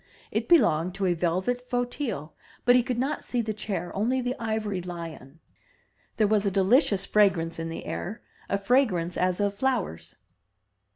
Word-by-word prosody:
It - - -2
belonged 180 - +4
to 195 -1 -1
a 180 - +3
velvet 185 +9 0
fauteuil, 245 - -3 0.3
but 245 0 +6
he 250 - +6
could 240 0 -3
not 270 +4 -1
see 245 - -2
the 215 -1 -2
chair, 200 -4 -4
only 235 +6 +1
the 250 0 -1
ivory 220 -4 -2
Hon. 165 -5 -8 0.8
There 215 - +4
was 210 -1 +2
a 200 - +2
delicious 195 - +3
fra 210 -1 +5
grance 165 -2 -5
in 165 0 -3
the 165 - -6
air, 215 +5 -5
— - - -28
a 200 - +1
fragrance 195 -6 +1
as 180 +1 0
of 205 -1 +1
flowers. 230 - -2
200 Hz, 175 wpm, -27 LUFS, 175-245 Hz, 0.8 s, but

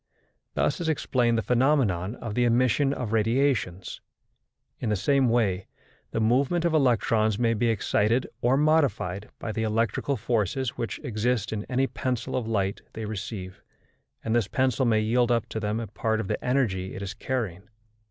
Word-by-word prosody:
Thus - - 0
is 165 - -1
explained 125 -6 +1
the 115 - 0
phenomenon 120 - +2
of 115 -4 -6
the 125 - +2
emission 125 +3 +3
of 125 -6 -3
radiations. 115 -5 0 0.8
In 115 - -2
the 105 - +2
same 135 +5 +2
way, 105 -5 +1 0.4
the - - -2
movement 135 +10 +2
of 170 - +2
electrons 115 -6 +2
may 115 -1 +2
be 115 +2 +1
excited 110 +2 +1 0.2
or 125 +3 +3
modified 140 - +1
by 110 - -4
the 110 - -3
electrical 115 +5 0
forces 115 +2 0
which 115 -2 -3
exist 115 -1 -1
in 105 -1 -4
any 130 +1 +1
pencil 125 -2 -3
of 125 -3 -2
light 100 -3 -1
they 110 - -5
receive, 100 -2 -6 0.6
and 115 0 0
this 115 -4 +2
pencil 130 +1 +1
may 110 -2 +3
yield 120 +3 +2
up 115 -2 +1
to 110 - -3
them 105 +1 -1
a 115 - -3
part 110 +2 -1
of 110 - -3
the - - -3
energy 110 -8 0
it 100 - -5
is 100 0 -4
carrying. 105 -6 -4
115 Hz, 170 wpm, -26 LUFS, 105-130 Hz, 0.8 s, emission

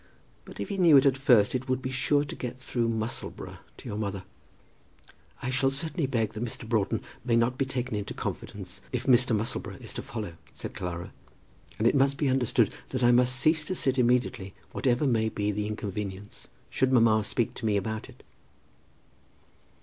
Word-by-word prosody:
But - - -12
if - - -4
he 200 -1 -3
knew 165 -5 +7
it 135 - +5
at 135 -2 +5
first 125 -7 +4
it 130 0 -3
would 130 -1 +1
be 130 0 -4
sure 145 +2 +2
to 145 - -6
get 125 0 -5
through 120 -2 -1
Musselboro 110 0 -4 0.2
to - - -11
your 105 - -4
mother." 100 -3 -3 1.2
"I 125 - -1
certainly 135 +4 0
shall 135 - -5
beg 115 -4 0
that 110 +2 -4
Mr. 115 -1 -4
Broughton 110 -4 0 0.2
may 120 -2 +2
not 115 +2 +2
be 135 - 0
taken 125 -2 -3
into 105 -1 -4
confidence - - -6
if - - -2
Mr. 125 -2 +4
Musselboro 110 +2 -2
is - - -7
to - - -4
follow," 105 -7 -6 0.2
said - - -7
Clara. 90 -2 -5 0.6
"And 110 - -1
it - - +4
must 140 0 +3
be 140 - +1
understood 130 -3 +2 0.2
that 130 -1 -2
I 120 - +6
must 125 +1 +4
cease 155 +2 +3
to 185 - -2
sit 130 -5 +1
immediately, 120 -6 +1 0.2
whatever 125 +2 +1
may 110 -4 +2
be 105 -1 -1
the 105 +1 -2
inconvenience, 105 -1 -5 0.2
should 130 0 +1
mamma 115 -3 +5
speak 115 +3 0
to 120 - -6
me 105 -1 +2
about 110 +2 -3
it." - - -16
120 Hz, 190 wpm, -28 LUFS, 110-130 Hz, 1.2 s, knew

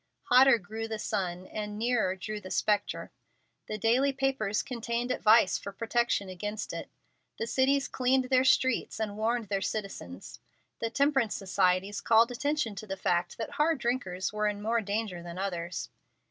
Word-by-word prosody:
Hotter 255 0 +7
grew 220 +3 -6
the 220 -1 -3
sun, 185 -4 -3
and 210 +1 -5
nearer 220 -5 +1
drew 210 +3 -5
the 185 - -9
spectre. 205 +2 0 0.6
The 215 - -3
daily 245 +6 +3
papers 270 -6 0
contained 235 0 -3
advice 215 -5 +4
for 200 - -7
protection 230 0 0
against 205 +3 -5
it. - - -6 0.5
The 460 - -2
cities 275 - +2
cleaned 260 +1 +2
their 255 0 +5
streets 260 -3 +2
and 210 -2 -2
warned 225 0 -1
their 195 -1 0
citizens. 115 - -5 0.4
The 230 - -1
temperance 270 -3 +2
societies 190 0 +1
called 230 +1 +4
attention 285 -2 -1
to 215 - -7
the 195 0 -4
fact 175 -1 0
that 225 - -4
hard 315 +1 +2
drinkers 235 -7 -2
were 210 0 0
in 205 -1 -2
more 225 +2 0
danger 205 -3 -3
than 170 0 -8
others. 175 -3 -3
215 Hz, 160 wpm, -29 LUFS, 195-245 Hz, 0.6 s, Hotter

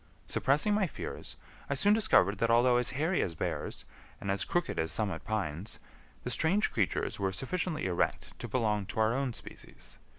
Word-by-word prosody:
Suppressing 150 +10 +2
my 205 -2 +2
fears, - - -7 0.3
I 140 - +1
soon 200 +9 +4
discovered 105 - +4
that 115 - +2
although 120 +1 +5
as 125 -1 +2
hairy 160 +7 +1
as 85 - -2
bears - - -3 0.3
and 100 - -2
as 100 - -1
crooked 175 - -1
as 80 -1 0
summit 95 0 -1
pines, 100 -3 -3 0.5
the - - -3
strange 195 +7 +2
creatures 100 -2 0
were 95 -1 0
sufficiently 155 - -2
erect 90 -2 -1
to 120 - -5
belong 105 -4 0
to 110 - -5
our 110 +1 +3
own 135 0 0
species. - - -9
115 Hz, 175 wpm, -31 LUFS, 100-155 Hz, 0.5 s, although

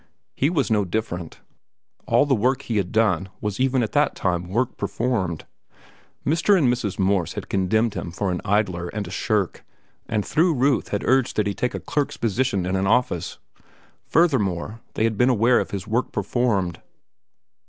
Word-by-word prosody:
He 140 - +1
was 145 -8 0
no 105 -2 +3
different. 90 -4 -4 0.7
All - - +4
the 140 - +2
work 125 +3 +1
he 115 - -2
had 95 -3 -1
done 110 -3 +2
was 105 -2 -3
even 130 -1 +2
at 110 - -3
that 145 0 +2
time 90 -1 -1
work 120 +7 -1
performed. 95 -10 -2 0.8
Mr. 170 +7 +3
and 130 -8 +3
Mrs. 110 -6 -3
Morse 95 -3 +1
had - - -7
condemned 110 +4 +1
him - - -5
for 95 +3 -2
an 90 - -3
idler 95 -4 0
and 100 +1 -4
a - - -8
shirk 100 -1 -1 0.4
and 110 -3 -1
through 165 +1 +2
Ruth 135 0 +2
had 100 - -2
urged 130 -1 +2
that 105 - +1
he 100 - -1
take 125 +5 -2
a - - -3
clerk's 145 -2 -2
position 115 -3 0
in 90 +1 -1
an 95 0 0
office. 110 -7 +1 0.7
Furthermore, 115 - +1
they - - 0
had 110 -2 0
been 125 - +5
aware 120 0 +4
of - - -3
his 95 -2 -5
work 115 +4 -1
performed. 100 -4 -1
110 Hz, 180 wpm, -23 LUFS, 95-125 Hz, 0.8 s, been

